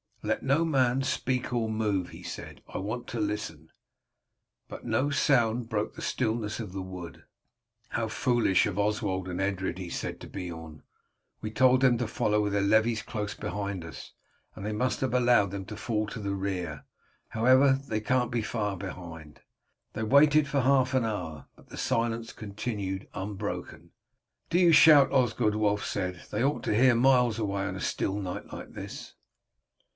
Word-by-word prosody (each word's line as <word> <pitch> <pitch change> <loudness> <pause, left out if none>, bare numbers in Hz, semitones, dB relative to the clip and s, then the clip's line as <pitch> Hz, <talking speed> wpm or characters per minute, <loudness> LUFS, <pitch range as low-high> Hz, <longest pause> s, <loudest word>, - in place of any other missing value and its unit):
"Let - - -1
no 140 +5 +2
man 135 -4 +2
speak 130 -1 -1
or 115 -2 0
move," 105 -4 -1
he - - -11
said, - - -8
"I - - -6
want 110 +6 -4
to 120 - -4
listen." 105 -7 -4 1.0
But - - -9
no 120 +5 +1
sound 120 -5 +2
broke 105 -1 -1
the - - -8
stillness 110 -1 -1
of 105 -5 -6
the 95 - -4
wood. 90 -2 -8 0.7
"How 115 - -1
foolish 120 -4 +2
of 90 - -3
Oswald 100 -3 0
and 90 +1 -3
Edred," 95 -1 -1
he 90 -2 -6
said - - -4
to - - -8
Beorn. 80 -4 -8 0.6
"We 110 - -4
told 130 +2 +4
them 125 -3 +5
to 125 - -1
follow 105 -1 +1
with 105 -1 -1
their 100 - +2
levies 110 +2 +3
close 105 -2 -4
behind 100 -1 -4
us, 80 - -10 0.4
and 95 - -7
they 105 - -2
must 125 +5 -1
have 130 -2 0
allowed 120 -6 +4
them 100 -1 -5
to 105 - -7
fall 110 -1 -1
to - - -6
the 100 -1 -2
rear. 90 -6 -4 0.4
However, 130 +4 +5
they 110 - -1
can't 125 +2 0
be 120 -2 0
far 105 -3 -2
behind." 85 -5 -9 0.5
They 110 - -3
waited 145 +5 +5
for 140 -2 +1
half 130 0 +3
an 125 -3 +2
hour, 80 -9 -4
but - - -21
the - - -9
silence 115 0 -1
continued 100 -2 -4
unbroken. 95 +1 -5 0.6
"Do 175 - +2
you 175 -2 +6
shout, 150 -3 +7
Osgod," 120 -5 +2
Wulf 105 -1 +1
said; 90 -3 -3
"they 105 +3 0
ought 140 +2 0
to - - 0
hear 125 +2 +5
miles 125 -2 +4
away 100 -3 -1
on 95 -2 -3
a - - -6
still 100 0 -1
night 90 -3 -5
like - - -8
this." - - -8
110 Hz, 175 wpm, -28 LUFS, 100-125 Hz, 1.0 s, shout